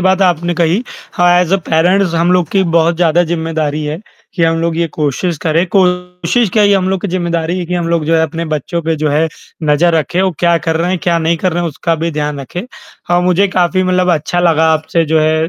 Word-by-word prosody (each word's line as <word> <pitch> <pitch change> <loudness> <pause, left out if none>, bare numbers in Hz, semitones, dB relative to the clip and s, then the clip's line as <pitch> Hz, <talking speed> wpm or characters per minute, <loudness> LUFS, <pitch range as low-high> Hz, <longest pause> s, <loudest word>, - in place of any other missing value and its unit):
बात 190 +1 +2
आपने 175 -1 +1
कही। 170 +6 +1 0.3
हाँ, 175 -1 +3
एस 180 0 -1
अ - - +5
पेरेंट्स 175 +3 +2
हम 170 +2 +2
लोग 180 -3 +1
की 195 - +2
बहुत 165 +1 +2
ज़्यादा 170 0 +2
ज़िम्मेदारी 160 -2 -2
है 150 +2 -4 0.4
कि 175 - -1
हम 165 0 +2
लोग 165 -1 -1
ये 170 0 0
कोशिश 155 +3 -2
करें। 165 +1 +1
कोशिश 180 +3 +1
क्या 215 - +3
ये 205 -1 +4
हम 185 -1 +1
लोग 190 -1 -1
की 205 - -2
ज़िम्मेदारी 170 -1 -2
है 180 - -3
कि 180 - -3
हम 170 -1 -2
लोग 170 -2 0
जो 165 +2 +1
है 160 - +2
अपने 165 +1 -3
बच्चों 155 +2 -3
पे 165 0 -1
जो 155 0 -1
है, 155 +3 +1 0.3
नज़र 155 +3 +2
रखे 165 +4 0
वो 190 - +1
क्या 170 -1 +3
कर 160 +1 -2
रहे 170 +2 -1
हैं, 185 - -1
क्या 170 -1 +1
नहीं 165 +1 0
कर 180 +2 -1
रहे 175 +1 -1
हैं 170 - -1
उसका 165 +2 -2
भी 165 +1 -2
ध्यान 150 -2 -3
रखे 175 - -7 0.4
और 175 0 +3
मुझे 185 +2 +2
काफ़ी 185 0 +1
मतलब 185 0 +1
अच्छा 160 +3 -2
लगा 160 -2 +3
आपसे 160 +1 0
जो 160 0 +1
है 155 +1 +1
170 Hz, 245 wpm, -14 LUFS, 160-180 Hz, 0.4 s, अ